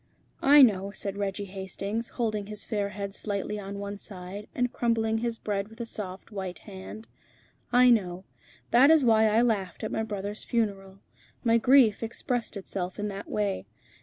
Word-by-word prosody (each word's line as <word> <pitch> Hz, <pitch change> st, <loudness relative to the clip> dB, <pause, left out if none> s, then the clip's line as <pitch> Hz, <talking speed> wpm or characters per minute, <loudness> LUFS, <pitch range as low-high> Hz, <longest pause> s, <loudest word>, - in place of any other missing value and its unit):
"I 285 Hz, +1 st, +8 dB
know," 200 Hz, -5 st, +3 dB
said 200 Hz, -1 st, -3 dB
Reggie 200 Hz, 0 st, -3 dB
Hastings, 195 Hz, +4 st, -4 dB
holding 215 Hz, -4 st, -1 dB
his 210 Hz, 0 st, -5 dB
fair 205 Hz, -3 st, -2 dB
head 200 Hz, -1 st, -5 dB
slightly 205 Hz, 0 st, -3 dB
on 200 Hz, 0 st, -6 dB
one 200 Hz, 0 st, -5 dB
side, 195 Hz, +2 st, -8 dB
and 245 Hz, -1 st, 0 dB
crumbling 225 Hz, -2 st, +1 dB
his 235 Hz, 0 st, -2 dB
bread 200 Hz, -2 st, -2 dB
with 225 Hz, +2 st, -16 dB
a 235 Hz, -, -3 dB
soft, 195 Hz, -2 st, -5 dB
white 190 Hz, -3 st, -5 dB
hand 205 Hz, +2 st, -10 dB, 0.6 s
"I 250 Hz, 0 st, +6 dB
know. 185 Hz, -5 st, +1 dB, 0.5 s
That 255 Hz, +4 st, +7 dB
is 315 Hz, -4 st, +6 dB
why 220 Hz, -1 st, +5 dB
I 220 Hz, +2 st, +4 dB
laughed 200 Hz, -7 st, -1 dB
at 215 Hz, -, -3 dB
my 220 Hz, -, -1 dB
brother's 205 Hz, -1 st, -4 dB
funeral. 195 Hz, -4 st, -2 dB, 0.5 s
My 230 Hz, -1 st, +4 dB
grief 245 Hz, -3 st, +5 dB
expressed 230 Hz, 0 st, -2 dB
itself 185 Hz, -1 st, -4 dB
in 210 Hz, 0 st, -2 dB
that 200 Hz, 0 st, -7 dB
way. 205 Hz, -2 st, -1 dB
210 Hz, 170 wpm, -28 LUFS, 195-230 Hz, 0.6 s, I